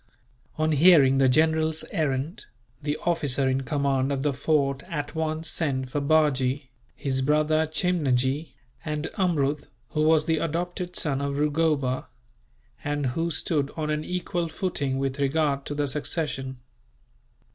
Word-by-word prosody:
On 155 0 +1
hearing 145 -4 +6
the 135 -1 +5
general's 160 +3 +2
errand, 155 - -2 0.3
the 145 0 -1
officer 145 -6 +1
in 130 +1 +1
command 135 0 0
of 135 -1 -1
the 145 -1 +1
fort 140 -1 +1
at 150 -4 -4
once 160 0 -2
sent 130 -6 -1
for 145 - -1
Bajee, 140 -3 +1 0.2
his 130 -2 -1
brother 155 +3 +2
Chimnajee, 145 -4 0 0.3
and 150 0 -3
Amrud 150 -6 +1 0.2
who 155 - -1
was 155 0 +4
the 160 -1 +1
adopted 175 +3 -3
son 140 -3 0
of 140 0 -2
Rugoba, 150 -3 +1 0.8
and 145 -1 -1
who 165 +3 -1
stood 145 -2 -1
on 155 -1 -1
an 150 0 -1
equal 175 0 -2
footing 145 -5 -2
with 135 0 -2
regard 140 0 +1
to 145 - -4
the 145 0 0
succession. 135 -2 -3
150 Hz, 140 wpm, -26 LUFS, 135-160 Hz, 0.8 s, hearing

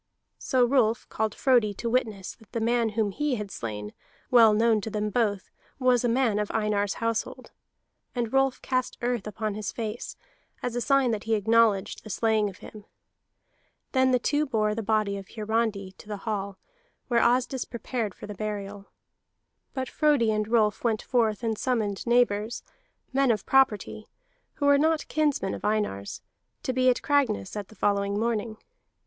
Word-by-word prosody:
So 255 -2 +2
Rolf 240 -3 +2
called 220 -1 -2
Frodi 240 -7 +3
to 235 - -4
witness 220 -6 -1
that 220 - -22
the 230 - -1
man 230 0 +1
whom 215 -1 0
he 295 +4 -1
had 210 -3 -5
slain, 105 -2 -6 0.4
well 230 -3 +7
known 220 0 +3
to 220 - -5
them 210 0 -2
both, 205 -4 0 0.3
was 255 -2 +3
a 240 - +2
man 230 -3 +2
of 210 - -2
Einar's 210 -2 0
household. 230 -1 -3 0.6
And 235 -1 -2
Rolf 270 -1 +2
cast 255 -1 -1
earth 240 -4 -1
upon 215 0 -3
his 210 -1 -4
face, 225 0 -5 0.5
as 245 -1 -2
a 245 - -1
sign 270 0 +3
that 215 -1 -3
he 225 0 +2
acknowledged 220 -1 +2
the 215 - -10
slaying 215 0 +1
of 190 - -12
him. 210 -2 -11 1.1
Then 260 -1 +3
the 255 - +4
two 290 +5 0
bore 215 -4 +1
the 225 - -3
body 215 -2 0
of 195 -1 -9
Hiarandi 215 -3 -1
to - - -14
the 210 -1 -4
hall, 200 -3 -3 0.5
where 235 -2 +3
Asdis 250 +1 +1
prepared 235 -2 -4
for - - -9
the 210 - -7
burial. 205 -1 -5 0.9
But 260 -1 -2
Frodi 290 -8 +2
and 215 -1 -1
Rolf 220 -2 +2
went 225 -3 0
forth 230 -3 +1
and 225 -1 0
summoned 220 -5 -1
neighbors, 235 -2 +2 0.5
men 270 0 +3
of 215 -4 +1
property, 220 -5 +2 0.5
who 285 - -2
were 285 0 +5
not 315 +1 +1
kinsmen 290 -11 0
of - - -7
Einar's, 210 - -2 0.4
to 255 - -1
be 255 0 +3
at 250 - +1
Cragness 255 -9 +1
at 205 -2 -5
the 220 - -16
following 200 0 0
morning. 225 -1 -1
220 Hz, 175 wpm, -27 LUFS, 210-245 Hz, 1.1 s, well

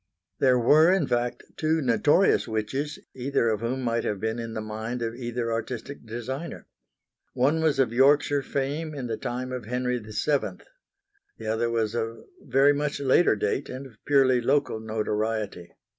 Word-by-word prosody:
There 130 -2 +4
were 155 +8 +5
in 190 -5 +2
fact 120 -1 -1
two 160 +1 +1
notorious 145 - +3
witches, 125 +7 -2 0.2
either 130 -2 0
of 110 -2 0
whom 130 +3 -2
might 115 -1 0
have 105 -2 -2
been 110 +3 -2
in 115 -1 -5
the - - -2
mind 110 +3 -4
of 115 0 -2
either 120 -1 -3
artistic 115 +2 -5
designer. 130 +8 -5 0.7
One 145 +6 +2
was 155 -3 +2
of 130 -4 +2
Yorkshire 145 +2 +4
fame 145 +4 -3
in 135 -3 -4
the 115 -2 -2
time 125 +3 -4
of 125 -4 -5
Henry 125 +1 -1
VII. 115 +7 -1 0.8
The - - -9
other 110 +2 0
was 115 -2 0
of 115 -1 -2 0.2
very 140 +2 +4
much 145 0 -2
later 140 +5 +4
date 430 -1 -1
and 130 +2 -6
of 115 -6 -16
purely 130 -3 +4
local 135 -2 +1
notoriety. 110 -3 -2
125 Hz, 165 wpm, -26 LUFS, 115-140 Hz, 0.8 s, were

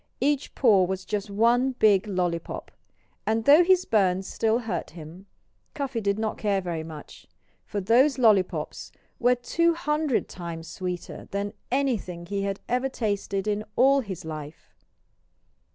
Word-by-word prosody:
Each 285 +1 0
paw 205 -8 +5
was 190 +1 -4
just 205 +1 -3
one 240 +5 +2
big 215 -3 +3
lollypop! 180 -4 -3 0.6
And 220 +1 +1
though 300 +5 +8
his 370 0 +3
burns 190 -3 +2
still 225 +3 +1
hurt 230 -3 -4
him, 170 +4 -11 0.5
Cuffy 275 -5 -3
did 200 -1 0
not 220 -1 -2
care 205 -2 +1
very 175 -3 -3
much. 160 -2 -11 0.4
For 205 - -3
those 245 +9 +4
lollypops 210 -7 +1 0.3
were 245 +1 +4
two 335 +7 +1
hundred 300 -5 0
times 170 -2 -7
sweeter 180 0 -6
than 200 +1 -3 0.2
anything 230 -10 -1
he 200 +2 -3
had 195 0 -2
ever 250 +2 0
tasted 200 -4 -2
in 210 0 0
all 275 +3 +5
his 190 -9 -6
life! 155 -1 -8
210 Hz, 145 wpm, -26 LUFS, 185-250 Hz, 0.6 s, though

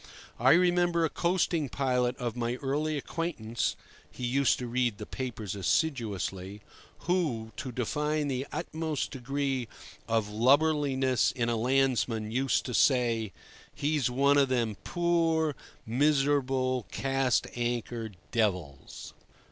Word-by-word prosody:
I 130 +3 +6
remember 175 -1 +3
a 160 - -2
coasting 170 -4 0
pilot 125 -2 0
of 120 -2 -3
my 120 0 -1
early 150 +3 -1
acquaintance 135 -7 -2 0.3
(he 125 - -6
used 135 +2 +2
to 125 - -5
read 120 -2 0
the 105 - -7
papers 115 -6 -5
assiduously) 100 - -1 0.4
who, 150 -12 -1
to 130 - -5
define 150 +5 -1
the 135 0 -2
utmost 160 -2 -3
degree 135 -1 -2 0.4
of 115 -2 +1
lubberliness 135 +3 +3
in 120 -2 -1
a 120 - +1
landsman, 120 -3 +1
used 130 +3 +1
to 125 - -4
say, 115 -5 +2 0.4
"He's 145 -3 0
one 140 +3 +3
of 135 -1 +3
them 120 -4 0
poor, 165 -3 +1 0.3
miserable 135 -1 +1
'cast 135 -2 +1
anchor' 120 -1 -2 0.2
devils." 90 -11 -2
130 Hz, 120 wpm, -29 LUFS, 115-145 Hz, 0.4 s, I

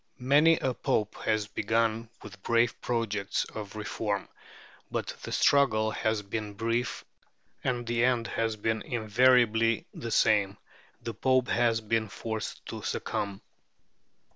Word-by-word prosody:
Many 145 +6 +5
a 130 - -1
Pope 105 -2 0
has 110 -1 +1
begun 110 +2 0
with 100 -2 -11
brave 115 +2 +1
projects 105 -4 -1
of 105 -1 -8
reform; 105 -1 -3 0.6
but - - -3
the - - -7
struggle 110 -6 +3
has 110 0 -1
been 105 0 -5
brief, 115 +2 -2 0.6
and 120 -1 -1
the 120 0 0
end 125 -2 +2
has 115 -1 -1
been 110 +1 -1
invariably 115 0 +3
the 115 - -6
same: 105 -2 +3 0.5
the 115 -1 -4
Pope 130 +3 +2
has 115 -1 +2
been 110 0 0
forced 110 +1 -5
to - - -6
succumb. 100 -1 -3
115 Hz, 130 wpm, -29 LUFS, 105-120 Hz, 0.6 s, Many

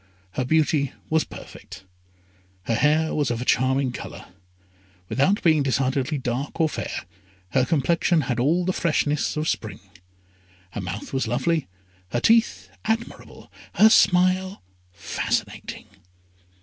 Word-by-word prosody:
Her 130 - -2
beauty 150 -1 +1 0.2
was 160 0 +3
perfect. - - -12 0.8
Her 115 - -1
hair 155 +6 +2
was 145 -2 0
of 120 -1 -2
a 125 - -4
charming 130 +1 +2
colour. - - -8 0.8
Without 190 +10 +1
being 155 -3 +4
decidedly 135 +1 0
dark 130 +4 -4
or 160 - +4
fair, - - -5 0.4
her 130 +4 +2
complexion 165 +2 +2
had 120 -2 -2
all 165 +8 +2
the 185 - 0
freshness 150 -3 0
of 155 +1 -1
spring. - - -3 0.9
Her 100 - -5
mouth 95 +7 -6
was 135 -3 0
lovely, 135 +6 0 0.5
her 120 - +2
teeth 230 - +2
admirable, 225 +1 -4 0.2
her 220 +1 +7
smile 185 - +3 0.3
fascinating. 90 - -3
150 Hz, 125 wpm, -24 LUFS, 130-170 Hz, 0.9 s, her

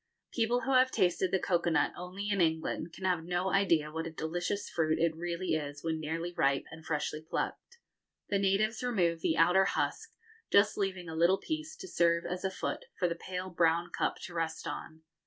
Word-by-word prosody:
People 240 +1 +1
who 270 - 0
have 255 0 +6
tasted 185 -4 +2
the 190 - +2
cocoa 175 -2 +1
nut 150 -3 +2
only 185 +3 -6
in 200 -2 +2
England 160 0 0
can 190 - -7
have 180 -3 +1
no 180 +2 -1
idea 165 -6 +3
what 160 +1 -3
a - - -4
delicious 175 +5 -3
fruit 155 -1 +1
it 165 -1 +1
really 175 +2 -2
is 145 -2 -3
when 160 -1 -1
nearly 165 +3 -3
ripe 140 -5 +2
and 160 0 -10
freshly 155 0 -2
plucked. 475 - -4 0.5
The 200 - +1
natives 200 +3 +2
remove 180 -10 +1
the 160 - +1
outer 180 +4 +5
husk, - - -1 0.4
just 200 +1 +5
leaving 190 -3 -2
a 160 - -6
little 170 +4 +4
piece 315 +4 -4
to 380 +1 -9
serve 170 - +2
as 180 +1 -4
a 190 - +1
foot 190 - -4
for 180 - +2
the 170 - -1
pale 185 +2 -5
brown 170 0 +2
cup - - 0
to 175 - -7
rest 165 -1 -2
on. 160 0 -6
175 Hz, 200 wpm, -31 LUFS, 160-195 Hz, 0.5 s, have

